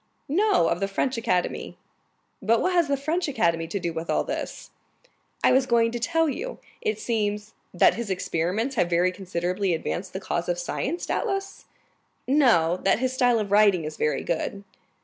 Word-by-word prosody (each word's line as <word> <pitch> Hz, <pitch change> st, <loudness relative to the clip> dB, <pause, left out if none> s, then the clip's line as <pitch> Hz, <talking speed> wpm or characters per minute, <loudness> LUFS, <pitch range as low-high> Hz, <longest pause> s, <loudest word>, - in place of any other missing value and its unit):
"No; 380 Hz, -, +3 dB
of 170 Hz, -, 0 dB
the 195 Hz, -, 0 dB
French 250 Hz, +6 st, -1 dB
Academy." 225 Hz, -6 st, -1 dB, 0.6 s
"But 230 Hz, +1 st, +3 dB
what 370 Hz, -, +1 dB
has 345 Hz, -3 st, +3 dB
the 280 Hz, 0 st, +1 dB
French 320 Hz, +5 st, -1 dB
Academy 170 Hz, -, 0 dB
to 200 Hz, -, -3 dB
do 170 Hz, -2 st, -3 dB
with 165 Hz, +1 st, -5 dB
all -, -, +2 dB
this?" -, -, -5 dB, 0.7 s
"I -, -, +5 dB
was 260 Hz, 0 st, +3 dB
going 230 Hz, -1 st, +3 dB
to 240 Hz, -, -3 dB
tell 325 Hz, +6 st, +1 dB
you. 470 Hz, -, -4 dB, 0.2 s
It 440 Hz, -2 st, -1 dB
seems——" 210 Hz, -, -2 dB, 0.2 s
"That 175 Hz, -, +4 dB
his 235 Hz, -2 st, -5 dB
experiments 190 Hz, +7 st, -1 dB
have 180 Hz, -3 st, +2 dB
very 175 Hz, +1 st, +2 dB
considerably 180 Hz, 0 st, -1 dB
advanced 180 Hz, +3 st, -4 dB
the 190 Hz, -, -3 dB
cause 175 Hz, -3 st, -3 dB
of 175 Hz, -, 0 dB
science, 275 Hz, -, -3 dB
doubtless?" 390 Hz, -3 st, -3 dB, 0.6 s
"No; 230 Hz, -, +4 dB
that -, -, +2 dB
his 255 Hz, +1 st, -1 dB
style 245 Hz, -2 st, +3 dB
of 205 Hz, -3 st, -2 dB
writing 205 Hz, -4 st, +5 dB
is 155 Hz, 0 st, -5 dB
very 150 Hz, -, 0 dB
good." 195 Hz, +4 st, -3 dB
210 Hz, 180 wpm, -25 LUFS, 175-275 Hz, 0.7 s, I